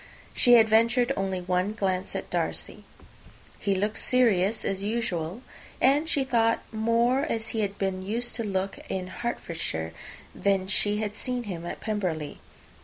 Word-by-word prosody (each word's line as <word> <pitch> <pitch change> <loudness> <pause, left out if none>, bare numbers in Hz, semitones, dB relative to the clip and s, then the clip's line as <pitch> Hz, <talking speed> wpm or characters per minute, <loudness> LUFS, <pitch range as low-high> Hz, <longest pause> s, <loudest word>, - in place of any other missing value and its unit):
She 245 - +5
had 225 -2 +8
ventured 235 +3 +3
only 190 -1 -1
one 180 +3 0
glance 190 -3 -1
at - - -5
Darcy. - - -2 0.7
He 200 -1 +1
looked 210 +3 -1
serious 220 -4 +3
as 195 0 -1
usual; 205 -2 -2 0.4
and, 290 +5 +3
she 280 - +2
thought, 230 -3 +2
more 230 +3 +2
as 225 -8 -2
he 225 - -2
had 200 -1 -1
been 190 -1 -1
used 230 +5 -2
to 230 - -2
look 195 -2 -2
in 185 -1 -2
Hertfordshire, 170 - -3 0.4
than 195 -1 +1
as 190 - -5
she 205 +1 +2
had 210 -1 -2
seen 250 +2 -3
him 175 -5 -5
at - - -6
Pemberley. 180 -9 -2
210 Hz, 160 wpm, -27 LUFS, 190-235 Hz, 0.7 s, had